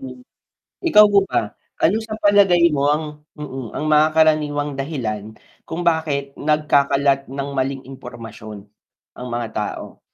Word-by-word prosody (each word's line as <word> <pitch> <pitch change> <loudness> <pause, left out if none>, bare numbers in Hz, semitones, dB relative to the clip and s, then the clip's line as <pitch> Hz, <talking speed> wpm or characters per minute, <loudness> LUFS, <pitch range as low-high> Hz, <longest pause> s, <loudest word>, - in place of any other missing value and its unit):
Hm, 255 -2 -10 0.6
ikaw 210 -10 +7
po 200 - +6
ba? 105 - -1 0.3
Anu 205 +7 +3
sa 220 -1 -6
palagay 195 -5 +4
mo 140 -1 +1
ang 150 +2 +1 0.3
mm 135 -5 -7
ang - - -3
mga 150 +1 +5
karaniwang 150 -2 +2
dahilan 110 -7 -4 0.3
kung 170 +2 -4
bakit 155 -5 0
nagkakalat 140 -2 +1
ng 140 +1 -5
maling 135 0 -2
impormasyon 115 -5 -10 0.6
ang 125 - -6
mga 120 -1 -3
tao? 105 -2 -5
145 Hz, 135 wpm, -20 LUFS, 130-160 Hz, 0.6 s, ikaw